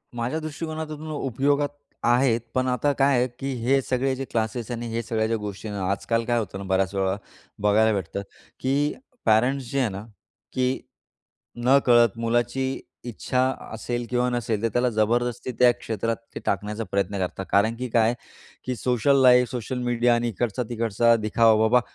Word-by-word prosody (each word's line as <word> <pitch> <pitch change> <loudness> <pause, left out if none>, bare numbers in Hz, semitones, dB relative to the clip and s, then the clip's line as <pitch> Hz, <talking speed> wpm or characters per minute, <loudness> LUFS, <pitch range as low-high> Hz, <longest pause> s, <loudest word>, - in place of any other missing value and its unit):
माझ्या 120 +6 -2
दृष्टीकोनातून 155 0 -5
उपयोगात 140 +1 0 0.3
आहेत. 120 -1 +3
पण 130 0 +1
आता 125 +3 +1
काय 135 -1 +4
आहे 125 +1 +2
की 135 0 -3
हे 135 +3 +3
सगळे 130 +1 0
जे 135 +1 -4
क्लासेस 115 +1 -2
आणि 120 0 -4
हे 115 +1 -2
सगळ्या 110 -1 0
ज्या 115 0 0
गोष्टीन 105 0 -6
आहे 100 - -4
ना, 95 - -1
आजकाल 115 +3 0
काय 120 0 +1
होतं 105 -3 -5
ना 100 - -6
बऱ्याच 95 0 +1
वेळा, 95 0 +1 0.5
बघायला 110 +2 +4
भेटतं 100 0 -3 0.4
की 140 +3 +1 0.3
पॅरेंट्स 125 +4 +2
जे 140 - 0
आहे 125 -4 +2
ना 100 +2 -7 0.5
की 130 0 0 0.9
नकळत 120 -4 +5
मुलाची 120 +3 0 0.3
इच्छा 125 +2 -2 0.3
असेल 120 +2 -3
किंवा 125 0 +1
नसेल, 115 -3 -1
तर - - +3
त्याला 125 +1 +2
जबरदस्ती 120 +3 0
त्या 125 -1 +7
क्षेत्रात 115 +1 -2 0.2
ते - - -3
टाकण्याचा 105 +3 -1
प्रयत्न 100 0 0
करतात. 95 +1 -3
कारण 110 +3 +3
की 125 +1 -4
काय 115 0 +3 0.5
की 125 - -2
सोशल 125 +4 +2
लाईफ, 125 -1 +6
सोशल 125 +1 -4
मीडिया 120 0 +2
आणि 120 0 0
इकडचा-तिकडचा 115 +1 +1
दिखावा. 110 0 +3
बाबा, 125 +3 +5
120 Hz, 165 wpm, -25 LUFS, 110-130 Hz, 0.9 s, त्या